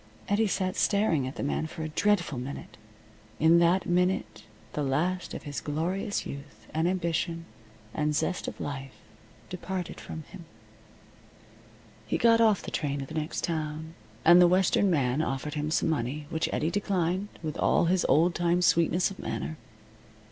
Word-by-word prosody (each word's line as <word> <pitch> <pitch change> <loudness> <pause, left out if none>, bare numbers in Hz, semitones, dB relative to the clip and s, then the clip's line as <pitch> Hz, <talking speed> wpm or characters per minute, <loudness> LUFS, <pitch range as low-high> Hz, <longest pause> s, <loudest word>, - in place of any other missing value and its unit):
Eddie 210 +2 +2
sat 185 -1 -1
staring 170 -10 +2
at 130 - -6
the - - -4
man 145 +2 -1
for 160 - -7
a 155 - -3
dreadful 175 -5 +1
minute. 130 +3 -7 0.6
In 165 +2 +6
that 175 +2 +3
minute 180 -4 0 0.3
the 150 - -2
last 165 +7 -1
of - - -7
his 145 -2 -5
glorious 180 +8 -2
youth, 140 -7 -9
and 160 +2 +1
ambition, 170 -2 -1 0.5
and 150 0 0
zest 180 +4 -1
of - - -6
life 135 -2 -5 0.5
departed 180 0 -5
from 160 - -7
him. 185 -4 -10 1.6
He - - 0
got 230 -1 +5
off 215 -4 +4
the - - -6
train 140 -2 -2
at 135 - -10
the - - -8
next 155 0 -3
town, 160 -1 -3 0.3
and 175 +2 +8
the 175 - +8
western 190 +2 +3
man 140 -4 +1
offered 145 0 -3
him 150 0 -2
some 160 - +1
money, 145 0 -2
which 160 - 0
Eddie 160 +2 0
declined 190 -1 0 0.2
with 155 -2 -3
all - - +3
his 180 +1 +2
old 165 +6 +4
time 175 +1 +1
sweetness 170 +2 +3
of 195 - -10
manner. 75 +3 -4
165 Hz, 165 wpm, -28 LUFS, 150-180 Hz, 1.6 s, and